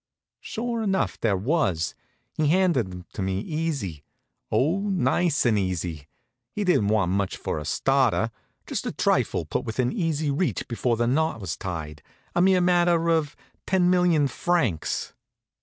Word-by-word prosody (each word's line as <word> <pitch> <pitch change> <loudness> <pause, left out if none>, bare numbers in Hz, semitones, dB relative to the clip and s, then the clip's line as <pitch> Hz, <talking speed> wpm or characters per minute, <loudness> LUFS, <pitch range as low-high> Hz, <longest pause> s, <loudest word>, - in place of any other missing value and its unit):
Sure 235 0 -3
enough, 195 -3 0
there 105 -4 +1
was. 95 - 0 0.4
He 155 - +1
handed 165 - +2
'em 90 -1 -9
to - - -5
me 95 0 -1
easy; 140 - -3 0.5
oh, 160 +9 +2
nice 175 -5 +1
and 110 -3 +3
easy! 85 -6 -3 0.4
He 210 - -2
didn't 180 - +3
want 105 -4 +2
much 100 0 -1
for - - -3
a 75 - -7
starter 125 - +2 0.3
just - - -3
a - - -1
trifle - - +1
put - - -2
within 125 +3 -1
easy 155 -4 0
reach 165 +6 -1
before 120 0 0
the 120 - +1
knot 150 +1 +1
was 95 -7 -4
tied, 80 -4 -6 0.3
a 175 - +2
mere 185 0 +4
matter 175 -2 +3
of 155 -3 +1 0.3
ten 180 -2 +3
million 175 -5 +3
francs. 130 - -1
135 Hz, 155 wpm, -25 LUFS, -, 0.5 s, mere